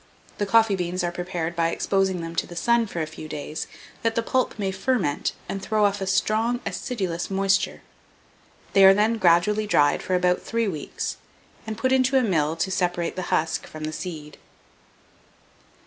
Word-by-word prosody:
The 205 Hz, -, 0 dB
coffee 220 Hz, 0 st, +4 dB
beans 180 Hz, 0 st, -2 dB
are 175 Hz, -, 0 dB
prepared 175 Hz, -1 st, -4 dB
by 165 Hz, -1 st, +2 dB
exposing 190 Hz, 0 st, 0 dB
them 165 Hz, 0 st, -6 dB
to -, -, 0 dB
the 175 Hz, -, -10 dB
sun 235 Hz, +4 st, +2 dB
for 170 Hz, -5 st, -3 dB
a -, -, -2 dB
few 155 Hz, 0 st, -9 dB
days, 150 Hz, +1 st, -5 dB, 0.3 s
that 230 Hz, -1 st, 0 dB
the 230 Hz, -, +1 dB
pulp 255 Hz, 0 st, 0 dB
may 195 Hz, -2 st, -1 dB
ferment 190 Hz, -, 0 dB, 0.2 s
and 195 Hz, -, -4 dB
throw 215 Hz, +1 st, +2 dB
off 200 Hz, 0 st, 0 dB
a 195 Hz, -, -2 dB
strong 215 Hz, +5 st, +1 dB
acidulous 190 Hz, -10 st, -3 dB
moisture. 195 Hz, 0 st, +1 dB, 0.9 s
They 195 Hz, -, +6 dB
are 195 Hz, 0 st, +9 dB
then 220 Hz, +2 st, +2 dB
gradually 190 Hz, +5 st, +3 dB
dried 145 Hz, -8 st, +3 dB
for 185 Hz, -, -1 dB
about 180 Hz, 0 st, +2 dB
three 230 Hz, -1 st, -1 dB
weeks, 155 Hz, -7 st, -4 dB, 0.5 s
and 220 Hz, -1 st, -4 dB
put 260 Hz, -, 0 dB
into 260 Hz, 0 st, +3 dB
a 260 Hz, -, +3 dB
mill 160 Hz, -7 st, +1 dB
to 190 Hz, +3 st, -1 dB
separate 175 Hz, -2 st, -1 dB
the 185 Hz, -1 st, -4 dB
husk 160 Hz, +1 st, 0 dB
from 155 Hz, 0 st, -9 dB
the 155 Hz, 0 st, -3 dB
seed. 155 Hz, -4 st, -7 dB
190 Hz, 180 wpm, -24 LUFS, 170-215 Hz, 0.9 s, are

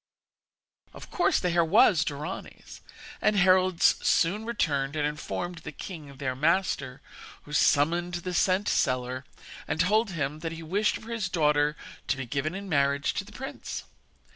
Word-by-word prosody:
Of -, -, -11 dB
course 355 Hz, -, +2 dB
the 180 Hz, -, 0 dB
hair 170 Hz, 0 st, +3 dB
was 165 Hz, -1 st, +5 dB
Dorani's, 150 Hz, +5 st, -7 dB, 0.4 s
and 210 Hz, -, +3 dB
heralds 185 Hz, -2 st, +4 dB
soon 200 Hz, +6 st, +2 dB
returned 150 Hz, -11 st, -1 dB
and 150 Hz, -1 st, 0 dB
informed 165 Hz, +3 st, -4 dB
the 150 Hz, -, -8 dB
king, 150 Hz, -3 st, -9 dB
their 130 Hz, -2 st, -2 dB
master, 150 Hz, -4 st, 0 dB, 0.4 s
who 150 Hz, -, -11 dB
summoned 170 Hz, +5 st, +2 dB
the 180 Hz, +1 st, -4 dB
scent 185 Hz, +3 st, +2 dB
seller, 130 Hz, +1 st, 0 dB, 0.4 s
and -, -, -2 dB
told 210 Hz, +6 st, +3 dB
him 150 Hz, -4 st, -3 dB
that 165 Hz, +1 st, -4 dB
he 165 Hz, 0 st, -8 dB
wished 200 Hz, +6 st, 0 dB
for 230 Hz, -, -10 dB
his 220 Hz, -5 st, -2 dB
daughter 150 Hz, -2 st, +2 dB, 0.3 s
to -, -, 0 dB
be 135 Hz, -, -4 dB
given 140 Hz, +7 st, -2 dB
in 200 Hz, +1 st, -6 dB
marriage 140 Hz, -3 st, +1 dB
to -, -, -2 dB
the 205 Hz, -, -15 dB
prince. 265 Hz, +5 st, -6 dB
165 Hz, 160 wpm, -27 LUFS, 145-185 Hz, 0.4 s, was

